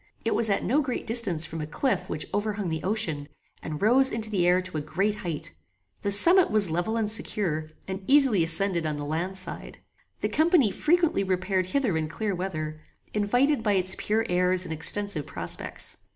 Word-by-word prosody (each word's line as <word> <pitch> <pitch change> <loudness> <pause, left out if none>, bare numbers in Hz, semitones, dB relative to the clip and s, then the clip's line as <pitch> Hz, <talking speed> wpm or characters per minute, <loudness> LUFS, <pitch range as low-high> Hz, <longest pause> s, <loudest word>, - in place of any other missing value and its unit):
It - - +1
was 225 - 0
at 200 - 0
no 285 +6 +1
great 260 -4 -4
distance 205 -9 +3
from 160 0 -7
a 150 - -5
cliff 260 - -2
which 150 - -3
overhung 205 -2 -2
the 160 -1 -3
ocean, 180 -8 -2 0.3
and 155 -2 -6
rose 255 +6 +4
into 220 -1 -3
the 180 -4 +1
air 180 +1 +4
to 185 -3 -6
a - - -2
great 190 +8 -1
height. 165 - -6 0.5
The 200 - -2
summit 340 - +8
was 210 -5 +2
level 175 +7 -1
and 220 -2 0
secure, 175 -7 0 0.2
and 190 +1 -5
easily 265 - +4
ascended 170 0 0
on 150 -1 -3
the 145 - -5
land 170 +6 -3
side. 185 - -7 0.4
The - - -1
company 315 - +2
frequently 330 - +1
repaired 185 0 -1
hither 235 -3 -1
in 155 -1 -2
clear 205 +5 -3
weather, 155 -4 -5 0.3
invited 245 +7 +1
by 210 -2 0
its 185 0 +1
pure 220 +2 -1
airs 180 +1 +2
and 160 - -5
extensive 160 0 0
prospects. - - -3
195 Hz, 190 wpm, -25 LUFS, 165-220 Hz, 0.5 s, summit